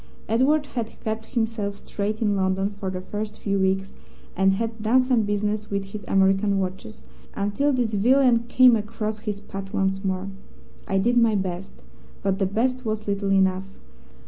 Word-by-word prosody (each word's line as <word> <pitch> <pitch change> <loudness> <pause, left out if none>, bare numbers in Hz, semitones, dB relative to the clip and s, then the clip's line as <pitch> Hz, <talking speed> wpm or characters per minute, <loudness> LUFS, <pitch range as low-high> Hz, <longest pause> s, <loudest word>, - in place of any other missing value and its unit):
Edward 280 +7 +3
had 230 -3 -4
kept 220 0 -3
himself 225 -4 -2
straight 210 +2 -2
in 205 -2 +2
London 190 +1 0
for 200 -2 -5
the 185 -1 -4
first 210 +3 -5
few 200 -1 -1
weeks, 190 0 0 0.4
and 190 +1 +3
had 225 +2 -3
done 240 +4 +4
some 255 -3 +2
business 210 0 -1
with 200 -1 -3
his 210 0 -6
American 195 +1 +3
watches, 190 +3 -5 0.3
until 205 +9 +1
this 245 -4 0
villain 240 +2 +4
came 250 0 +6
across 215 0 -3
his 210 -2 -4
path 195 -1 -8
once 195 -1 0
more. 190 0 -2 0.6
I 195 - +1
did 240 +5 +2
my 230 -2 +3
best, 190 -1 -3 0.5
but 195 0 0
the 195 - +2
best 255 +6 0
was 215 -2 -3
little 200 0 -1
enough. 190 0 +2
205 Hz, 170 wpm, -24 LUFS, 195-225 Hz, 0.6 s, came